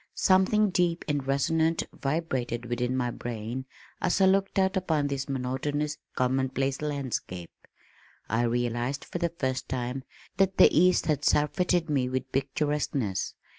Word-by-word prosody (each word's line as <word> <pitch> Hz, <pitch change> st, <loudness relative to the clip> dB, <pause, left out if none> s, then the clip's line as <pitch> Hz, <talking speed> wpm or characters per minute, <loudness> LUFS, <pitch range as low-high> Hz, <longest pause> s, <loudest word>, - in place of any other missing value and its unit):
Something 195 Hz, +2 st, +4 dB
deep 175 Hz, -2 st, +1 dB
and 145 Hz, -3 st, -1 dB
resonant 160 Hz, +4 st, +2 dB
vibrated 130 Hz, -5 st, -2 dB
within 120 Hz, +1 st, -1 dB
my 125 Hz, -1 st, 0 dB
brain 120 Hz, +2 st, -5 dB, 0.4 s
as 180 Hz, -, +1 dB
I 190 Hz, -, +6 dB
looked 195 Hz, +1 st, +2 dB
out 190 Hz, 0 st, +2 dB
upon 160 Hz, -6 st, +1 dB
this 140 Hz, -1 st, -3 dB
monotonous 140 Hz, +3 st, -2 dB, 0.2 s
commonplace 130 Hz, +1 st, 0 dB
landscape. 130 Hz, -, -4 dB, 0.8 s
I 115 Hz, +2 st, +1 dB
realized 120 Hz, +3 st, -1 dB
for 175 Hz, -, -5 dB
the 170 Hz, -1 st, +1 dB
first 130 Hz, -6 st, -3 dB
time 130 Hz, +1 st, -3 dB, 0.3 s
that 195 Hz, -1 st, +2 dB
the -, -, +7 dB
east 180 Hz, +3 st, +4 dB
had 155 Hz, -4 st, 0 dB
surfeited 170 Hz, +3 st, +2 dB
me 135 Hz, -5 st, +1 dB
with 130 Hz, 0 st, -3 dB
picturesqueness. 135 Hz, -6 st, -1 dB
140 Hz, 135 wpm, -28 LUFS, 125-165 Hz, 0.8 s, the